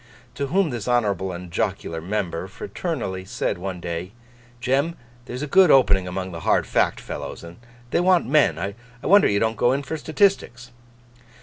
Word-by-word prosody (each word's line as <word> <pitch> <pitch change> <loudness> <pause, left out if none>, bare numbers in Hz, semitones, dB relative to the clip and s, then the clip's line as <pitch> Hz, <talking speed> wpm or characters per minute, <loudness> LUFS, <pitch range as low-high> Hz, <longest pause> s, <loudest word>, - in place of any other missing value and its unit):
To 140 - -3
whom 180 +1 +1
this 120 -2 -5
honourable 100 -6 +1
and 90 0 -8
jocular, 80 -1 -2
member 95 -1 -3
fraternally 100 - -4
said 95 - -3
one 95 -1 -5
day, 85 +3 -5 0.5
'Jem, 135 +7 0 0.3
there's 125 +2 -5
a - - -3
good 185 +4 +6
opening 100 -10 +4
among 95 +1 -4
the 85 - -6
hard - - +2
Fact - - +1
fellows, - - -7
and 85 0 -11 0.3
they - - +2
want 180 -1 +3
men. 150 +2 +3
I 100 +1 -3 0.3
wonder 200 +3 +6
you 100 - +1
don't 110 0 0
go 120 +4 +3
in 140 +1 -1
for 160 +4 -4
statistics. 155 - 0
115 Hz, 175 wpm, -23 LUFS, 95-145 Hz, 0.5 s, good